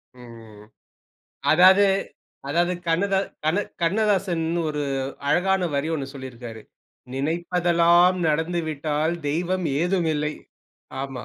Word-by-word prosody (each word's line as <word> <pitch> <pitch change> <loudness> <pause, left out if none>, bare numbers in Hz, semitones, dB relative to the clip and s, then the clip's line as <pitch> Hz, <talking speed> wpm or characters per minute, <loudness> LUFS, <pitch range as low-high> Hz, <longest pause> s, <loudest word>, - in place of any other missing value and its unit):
ம். 115 -4 -13 0.9
அதாவது 185 +4 +7 0.6
அதாவது 175 +4 +1 0.2
கண்ணதா 190 +4 +1 0.3
கண்ண 160 +5 +2 0.2
கண்ணதாசன்னு 175 -3 +1
ஒரு 150 -1 -3 0.5
அழகான 190 +3 +2
வரி 140 +3 -1
ஒன்ணு 140 -4 -3
சொல்லியிருக்கிறாரு, 120 -4 -9 0.5
"நினைப்பதெல்லாம் 170 +4 +2
நடந்துவிட்டால் 155 -1 -1
தெய்வம் 175 +4 -1 0.2
ஏதுமில்லை," 160 -5 0 0.7
ஆமா. 135 -2 -6
165 Hz, 85 wpm, -23 LUFS, 145-180 Hz, 0.9 s, அதாவது